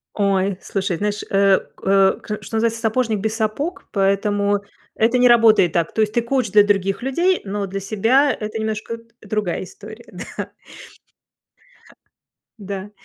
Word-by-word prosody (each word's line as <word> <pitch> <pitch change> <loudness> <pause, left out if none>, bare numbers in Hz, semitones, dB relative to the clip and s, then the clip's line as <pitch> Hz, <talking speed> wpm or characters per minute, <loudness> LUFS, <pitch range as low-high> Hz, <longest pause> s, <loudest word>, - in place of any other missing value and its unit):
Ой, 195 -2 +1
слушай, 195 -3 -2
знаешь, 205 +1 -2
э, 195 -1 +4 0.2
к - - -22
э, 195 0 +4
к 210 0 -6
что - - -6
называется, 230 0 0
сапожник 225 -1 0
без 220 +2 -2
сапог, 235 - -2
поэтому 200 +1 +1 0.4
это 230 +3 +2
не 250 0 +5
работает 225 -7 +5
так. 170 -1 0
То 220 - +1
есть 215 0 0
ты 235 - +2
коуч 240 -1 -1
для 210 0 +7
других 195 -1 0
людей, 345 +8 +1
но 200 0 -3
для 195 +1 -4
себя- 230 +8 +2
это 215 +1 -4
немножко 220 +1 -3
д 230 - -18 0.2
другая 210 -4 -2
история, 215 +5 -12 0.3
да. - - -4 2.1
Да, 200 0 -6
210 Hz, 155 wpm, -20 LUFS, 195-230 Hz, 2.1 s, для